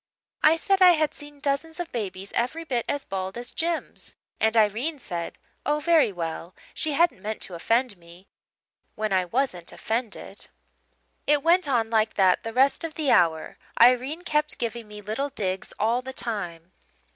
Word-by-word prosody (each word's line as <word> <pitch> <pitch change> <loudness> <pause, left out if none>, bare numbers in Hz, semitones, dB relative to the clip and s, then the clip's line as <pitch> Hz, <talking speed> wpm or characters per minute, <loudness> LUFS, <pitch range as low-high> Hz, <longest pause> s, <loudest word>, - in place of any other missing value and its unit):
I 310 +1 +6
said 385 +4 +1
I 360 -1 +9
had 310 -2 +1
seen 290 0 -11
dozens 295 +4 -2
of 350 - -4
babies 195 -4 -5
every 255 +8 -1
bit 250 -7 -1
as 285 - -2
bald 190 +1 -4
as 240 0 -4
Jims, 335 0 -4 0.2
and 220 +1 +3
Irene 225 +9 +2
said, 175 -9 -5 0.3
Oh 295 +1 +1
very 315 -6 +4
well, 170 0 -5 0.2
she 310 -2 -1
hadn't 325 - +2
meant 215 +2 -4
to 185 - -8
offend 225 +5 +1
me 170 +3 -16 0.7
when 215 -2 -1
I 185 -1 +2
wasn't 185 -5 -2
offended. 225 0 -4 0.8
"It 295 -1 +3
went 345 0 +4
on 230 -4 +1
like 220 -1 +2
that 190 -2 +4
the 225 - -5
rest 265 +7 +3
of 325 -2 -5
the 300 -4 +1
hour 160 -2 +2 0.2
Irene 255 +7 +4
kept 300 -2 0
giving 235 -1 -4
me 210 0 -9
little 220 +8 -2
digs 190 -8 -3
all 230 +4 +1
the 265 +1 -7
time. 180 -8 -5
240 Hz, 170 wpm, -25 LUFS, 200-295 Hz, 0.8 s, I